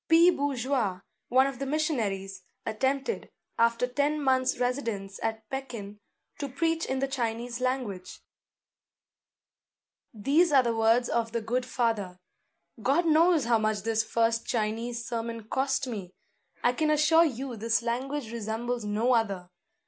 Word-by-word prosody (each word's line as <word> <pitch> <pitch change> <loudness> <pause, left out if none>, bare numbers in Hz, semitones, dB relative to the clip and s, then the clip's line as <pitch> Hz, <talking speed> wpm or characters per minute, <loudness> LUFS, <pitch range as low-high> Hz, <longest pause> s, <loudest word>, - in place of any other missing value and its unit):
P. 335 +2 +7
Bourgeois, 260 - -1 0.3
one 260 +2 +4
of 275 -3 -3
the 275 - -2
missionaries, 210 -11 -1 0.2
attempted, 270 - -1 0.3
after 230 +1 +3
ten 285 +4 0
months' 260 -2 +2
residence 230 -6 -2
at 220 -1 -3
Pekin, 235 -7 -6 0.4
to 280 -2 -3
preach 325 +4 0
in 265 - -1
the 275 +1 0
Chinese 240 -2 -3
language. 230 -8 -3 1.9
These 285 - +2
are 270 -3 +6
the 235 -1 0
words 225 +2 +3
of 230 -1 -1
the 235 - 0
good 250 +3 -1
father: 225 -8 -1 0.6
"God 280 +10 +2
knows 325 -1 +4
how 230 -1 +3
much 215 -2 0
this 225 0 +1
first 230 0 0
Chinese 235 +1 -2
sermon 230 -1 -4
cost 270 +4 0
me! 200 -7 -6 0.5
I 245 - +4
can 310 +4 0
assure 305 +2 +5
you 265 -3 -3
this 230 +2 0
language 250 +1 -2
resembles 235 +1 -3
no 215 +4 +1
other. 195 -6 0
240 Hz, 140 wpm, -28 LUFS, 225-275 Hz, 1.9 s, P